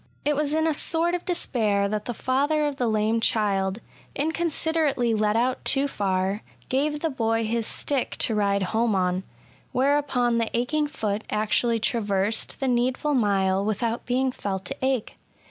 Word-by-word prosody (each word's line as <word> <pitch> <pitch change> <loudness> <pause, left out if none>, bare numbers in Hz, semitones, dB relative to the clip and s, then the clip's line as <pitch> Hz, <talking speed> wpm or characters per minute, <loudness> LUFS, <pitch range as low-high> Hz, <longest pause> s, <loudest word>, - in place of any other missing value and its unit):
It 295 0 +2
was 295 0 0
in 315 +1 +1
a 320 - +2
sort 330 +3 +1
of 355 - -2
despair 220 - +1
that 210 +1 -3
the 240 - -4
father 290 +5 +1
of 290 -2 -2
the 245 - 0
lame 220 +1 +1
child, 200 -4 +1 0.4
inconsiderately 315 -5 +1
led 215 0 +1
out 250 +2 0
too 275 +1 +2
far^ 195 -5 -1 0.3
gave 295 +3 0
the 325 - 0
boy 225 -3 0
his 230 0 -1
stick 275 -3 -1
to 225 - +1
ride 200 -2 +1
home 225 -1 +2
on; 180 -1 +1 0.5
whereupon 255 -3 +2
the 230 - 0
aching 295 +5 0
foot 215 -7 -3
actually 225 +2 +1
traversed 210 -1 -1
the 270 - -1
needful 255 +4 +1
mile 195 -5 +2
without 225 +3 -2
being 260 +1 +1
felt 190 -5 -4
to - - -4
ache. 260 -4 -1
235 Hz, 165 wpm, -25 LUFS, 210-280 Hz, 0.5 s, It